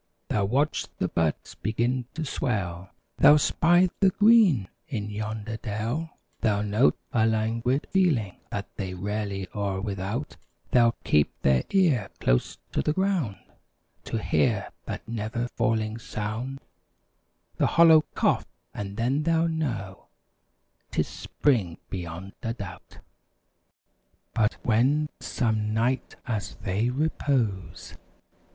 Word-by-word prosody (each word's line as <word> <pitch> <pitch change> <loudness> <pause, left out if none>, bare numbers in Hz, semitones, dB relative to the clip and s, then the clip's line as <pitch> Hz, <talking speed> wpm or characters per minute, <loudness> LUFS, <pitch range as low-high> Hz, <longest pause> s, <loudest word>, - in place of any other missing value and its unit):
They'll 100 -2 +1
watch 140 +8 +1
the - - 0
buds 80 -2 -1
begin 120 +4 -1
to 160 -1 -3
swell; 95 - -2 0.3
They'll 145 +2 +8
spy 175 +4 +4
the 195 - +6
green 205 - +5 0.2
in 105 -4 -4
yonder 110 +1 -4
dell; 115 +9 -3 0.2
They'll 105 -2 +1
note 105 +1 +3 0.2
a 110 -1 +4
languid 115 +4 0
feeling 145 - +2
(that 100 0 -3
They're 95 -2 -4
rarely 100 0 -3
e'er 100 -2 -1
without) 100 +7 -4 0.3
They'll 120 -2 +5
keep 75 -1 +2
their 65 -2 +3
ear 155 - +3
close - - +1
to - - 0
the 150 - +1
ground 185 - 0 0.7
To - - -2
hear 110 -1 +1
that - - -6
never 115 +1 -2
failing 115 -2 0
sound 115 +5 -4 1.0
(The - - +3
hollow 165 -2 +7
cough), - - +2 0.3
and 100 0 -6
then 130 +6 +1
they 165 +1 +2
know 115 -13 -3 0.8
'Tis - - 0
spring 105 - 0
beyond 90 +1 -6
a 115 - -2
doubt. 95 -5 -9 1.4
But 110 -2 +2
when, 135 +7 +3
some 110 -3 -1
night, 120 +3 0
as 110 -6 -3
they 100 +5 -1
repose. 130 -8 -1
115 Hz, 120 wpm, -26 LUFS, 100-140 Hz, 1.4 s, They'll